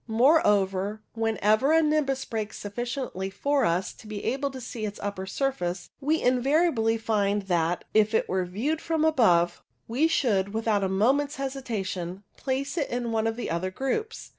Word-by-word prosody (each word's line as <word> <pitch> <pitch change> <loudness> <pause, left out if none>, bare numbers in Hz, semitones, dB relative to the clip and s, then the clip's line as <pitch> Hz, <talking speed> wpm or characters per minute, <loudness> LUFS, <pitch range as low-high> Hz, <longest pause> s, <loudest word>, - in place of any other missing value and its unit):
Moreover, 210 - +3
whenever 225 +4 +2
a 325 0 +5
nimbus 290 -3 +1
breaks 215 -3 -4
sufficiently 235 -2 -4
for 275 +7 +1
us 175 +3 0
to 220 - -15
be 210 -1 -6
able 275 +2 -1
to 265 -1 -8
see 240 -2 -6
its 205 -1 -4
upper 200 -2 -4
surface, 190 -8 -2
we 305 +3 +1
invariably 255 -2 +2
find 205 -2 0
that, 175 -2 0
if 215 +1 +3
it - - +2
were 185 0 0
viewed 255 - -2
from 320 -1 0
above, 175 - +3 0.3
we 260 +8 +2
should, 205 -10 +1
without 220 -3 +1
a 190 - +1
moment's 270 +9 +2
hesitation, 205 -9 -4
place 275 +4 -2
it 285 - -1
in 240 -1 -2
one 225 0 +1
of 225 - -1
the 240 - -4
other 170 +3 -1
groups. 270 - -3
225 Hz, 165 wpm, -27 LUFS, 195-270 Hz, 0.3 s, a